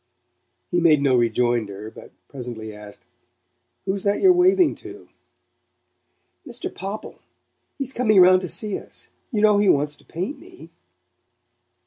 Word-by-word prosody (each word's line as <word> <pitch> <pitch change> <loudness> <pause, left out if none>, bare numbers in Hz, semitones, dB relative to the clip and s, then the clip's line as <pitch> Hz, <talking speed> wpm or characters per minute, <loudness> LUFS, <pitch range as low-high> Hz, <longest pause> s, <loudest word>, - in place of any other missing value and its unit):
He 175 - +2
made 160 -3 +5
no 140 -2 +2
rejoinder, 115 -3 0
but - - -13 0.2
presently 120 -5 -7
asked: 105 -1 -12 0.8
"Who's 195 0 -1
that 200 +1 0
you're 375 -2 +6
waving 360 -1 +4
to?" - - -12 1.3
"Mr. 245 -5 -6
Popple. 195 +4 -7 0.6
He's 270 -2 -3
coming 215 -6 +3
round 185 0 +6
to 180 - -4
see 210 +4 -3
us. - - -9 0.2
You 215 -4 0
know 210 -1 +5
he 205 -2 +3
wants 145 -1 +2
to - - -23
paint 185 - -5
me." 360 0 -15
185 Hz, 135 wpm, -22 LUFS, -, 1.3 s, you're